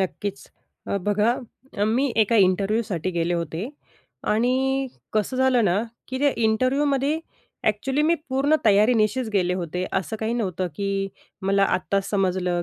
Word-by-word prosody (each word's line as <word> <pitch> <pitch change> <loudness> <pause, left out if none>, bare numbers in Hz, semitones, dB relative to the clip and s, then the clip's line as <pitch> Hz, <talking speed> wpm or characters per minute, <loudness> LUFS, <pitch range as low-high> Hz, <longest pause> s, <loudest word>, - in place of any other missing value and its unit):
नक्कीच, 200 +1 -3 0.5
अ, 200 - -1
बघा 210 +3 +3 0.5
अ, 205 - +3
मी 270 -2 +1
एका 230 +2 +1
इंटरव्ह्यूसाठी 195 -2 0
गेले 170 0 0
होते 170 +1 -3 0.7
आणि 240 +4 +2 0.6
कसं 215 +4 0
झालं 255 -3 +3
ना, 180 -1 +2 0.3
की 260 - -3
त्या 285 0 +3
इंटरव्ह्यूमध्ये 275 +5 +1 0.5
एक्चुअली 265 +7 0
मी 325 +3 +4
पूर्ण 270 +3 +2
तयारीनिशीच 220 +3 +3
गेले 180 -3 +2
होते 180 0 -3
असं 190 +3 -1
काही 220 +1 -1
नव्हतं, 185 -6 -1
की 200 - -2 0.6
मला 195 0 +4
आत्ताच 195 +1 -1
समजलं 180 -3 0
210 Hz, 140 wpm, -24 LUFS, 185-255 Hz, 0.7 s, मी